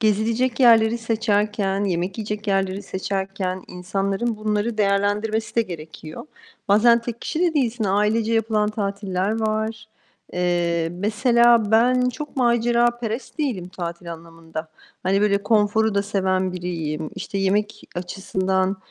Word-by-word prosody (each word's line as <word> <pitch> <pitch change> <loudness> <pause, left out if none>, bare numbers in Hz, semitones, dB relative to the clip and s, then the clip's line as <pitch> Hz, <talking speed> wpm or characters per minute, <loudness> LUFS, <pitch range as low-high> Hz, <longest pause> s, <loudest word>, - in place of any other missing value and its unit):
gezilecek 225 +4 +1
yerleri 230 -1 +6
seçerken, 210 -3 0
yemek 180 +1 -2
yiyecek 210 0 -4
yerleri 195 0 0
seçerken 190 -1 -3
insanların 195 +5 -2
bunları 215 +1 -1
değerlendirmesi 205 +2 +1
de 230 - +5
gerekiyor. 160 - -9 0.4
Bazen 235 +4 +6
tek 235 0 -6
kişi 315 - -3
de 350 -2 +2
değilsin, 240 -6 0
ailece 210 +3 +1
yapılan 215 -1 +1
tatiller 200 0 -2
var. 220 0 -2 0.4
Eee, 175 -2 0
mesela 225 +3 +3
ben 250 +3 +4
çok 295 +4 -6
maceraperest 240 0 +1
değilim 235 - -2
tatil 170 -1 -6
anlamında. 165 -1 -8 0.3
Hani 195 +2 +2
böyle 200 -1 +2
konforu 220 0 +2
da 200 - +2
seven 190 -2 0
biriyim. 165 -4 -4
İşte, 195 +1 -4
yemek 205 +2 0
açısından, 190 +1 -1
205 Hz, 120 wpm, -22 LUFS, 190-225 Hz, 0.4 s, yerleri